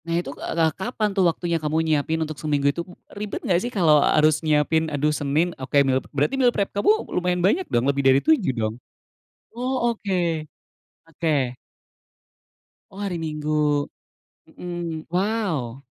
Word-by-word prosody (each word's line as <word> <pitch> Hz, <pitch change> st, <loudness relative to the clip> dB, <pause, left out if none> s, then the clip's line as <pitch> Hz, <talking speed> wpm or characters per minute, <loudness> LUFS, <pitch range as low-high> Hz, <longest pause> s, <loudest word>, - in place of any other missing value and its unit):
Nah 165 Hz, 0 st, -1 dB
itu, 175 Hz, -, -2 dB
k -, -, -18 dB
eee, -, -, -4 dB
ka 160 Hz, -1 st, +3 dB, 0.2 s
kapan 215 Hz, -4 st, 0 dB
tuh 195 Hz, -, +3 dB
waktunya 170 Hz, 0 st, -1 dB
kamu 155 Hz, +1 st, -1 dB
nyiapin 155 Hz, 0 st, +1 dB
untuk 155 Hz, -, -5 dB
seminggu 145 Hz, -2 st, 0 dB
itu, 170 Hz, -, -3 dB, 0.3 s
ribet 205 Hz, 0 st, -5 dB
enggak 175 Hz, -2 st, +3 dB
sih 240 Hz, -, -3 dB
kalo 170 Hz, -6 st, +4 dB
harus 155 Hz, +1 st, +4 dB
nyiapin 155 Hz, +1 st, +2 dB
aduh 150 Hz, +1 st, +1 dB
Senin, 150 Hz, +4 st, 0 dB
oke 130 Hz, +2 st, -1 dB
meal 130 Hz, 0 st, +2 dB
pe -, -, -19 dB
berarti 145 Hz, -, +2 dB
meal 250 Hz, -, +6 dB
prep 200 Hz, -, 0 dB
kamu 205 Hz, -, +3 dB, 0.2 s
lumayan 180 Hz, 0 st, 0 dB
banyak 330 Hz, -, +2 dB
dong, 120 Hz, +1 st, +1 dB
lebih 140 Hz, 0 st, +1 dB
dari 130 Hz, -, +6 dB
7 295 Hz, -, +3 dB
dong? 110 Hz, 0 st, -1 dB, 0.8 s
Oh, 245 Hz, 0 st, -1 dB
oke 205 Hz, -4 st, -3 dB, 0.9 s
oke. 145 Hz, -6 st, -1 dB, 1.4 s
Oh, 195 Hz, -, -11 dB
hari 200 Hz, -3 st, -3 dB
Minggu, 150 Hz, -1 st, 0 dB, 0.6 s
mmm, 175 Hz, -3 st, -6 dB
wow. 175 Hz, -, -1 dB
160 Hz, 160 wpm, -23 LUFS, 145-190 Hz, 1.4 s, meal